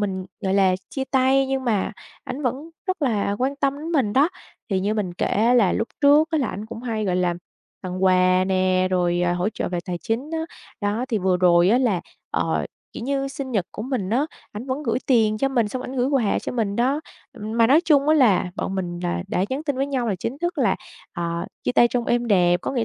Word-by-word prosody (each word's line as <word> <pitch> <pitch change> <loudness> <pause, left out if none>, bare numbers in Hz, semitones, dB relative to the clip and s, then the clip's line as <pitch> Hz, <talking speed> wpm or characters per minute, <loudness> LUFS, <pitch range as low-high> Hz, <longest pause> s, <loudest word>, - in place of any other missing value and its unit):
mình, 190 -2 -2 0.2
gọi 190 0 0
là, 190 -2 +4 0.2
chia 270 - -3
tay 265 0 +3
nhưng 265 0 -2
mà 215 -5 0 0.3
ảnh 260 +4 -5
vẫn 270 +5 -3 0.2
rất 370 -3 -2
là 205 -6 0
quan 270 +2 0
tâm 280 0 0
đến 320 +3 -5
mình 255 -10 +2
đó. 280 +7 +4 0.4
Thì 190 -1 +1
như 205 +3 0
mình 195 -5 -2
kể - - -1
á 230 +4 +2
là 215 -7 +4
lúc 225 - -1
trước 295 +3 +5
á 320 - +1
là 270 - 0
ảnh 210 +3 -6
cũng 230 +1 -8
hay, 225 -3 -2
gọi 185 -2 0
là, 180 -1 +1 0.5
tặng 185 0 -3
quà 185 0 +4
nè, 185 -1 +2
rồi, 175 -1 +1
à, 175 - +1
hỗ 180 +3 0
trợ 215 - -3
về 175 - -2
tài 175 -1 -4
chính 240 - -3
á, 325 - -1 0.4
đó, 205 +4 -1
thì 225 -5 0
vừa 185 -1 +2
rồi 175 -1 +4
á 235 +5 +4
là, 225 -9 +1 0.3
ờ, - - 0 0.3
kiểu - - -7
như, 275 +1 -1
sinh 270 -1 -6
nhật 195 -6 0
của - - -6
mình 245 -6 -2
á, 260 +7 +2 0.3
ảnh 210 +5 -7
vẫn 265 +2 -3
gửi - - 0
tiền 220 -4 +3
cho 270 - +1
mình 240 -5 +1
xong 255 +4 -4
ảnh 265 - -6
gửi 250 0 +2
quà 265 -7 +1
cho - - -5
mình 215 -5 -1
đó. 265 +5 +1 0.3
Ừm, 220 -2 -5
mà 230 - +6
nói 280 +7 +5
chung 295 -4 +3
á 310 - +6
là 215 -11 +3
bọn 190 - -3
mình 175 -2 -3
là 175 0 -1
đã 185 - 0
nhắn 270 +3 -2
tin 285 -4 -1
với 270 +1 0
nhau 260 -4 -1
là 205 - +1
chính 235 +9 -4
thức 345 +2 -2
là, - - +2 0.4
ờ, 170 -1 -3 0.2
chia - - +1
tay 240 - +5
trong 240 0 -1
êm 240 0 +1
đẹp, 175 -3 +4
có - - -2
nghĩa 240 -4 0
225 Hz, 250 wpm, -23 LUFS, 185-270 Hz, 0.5 s, mà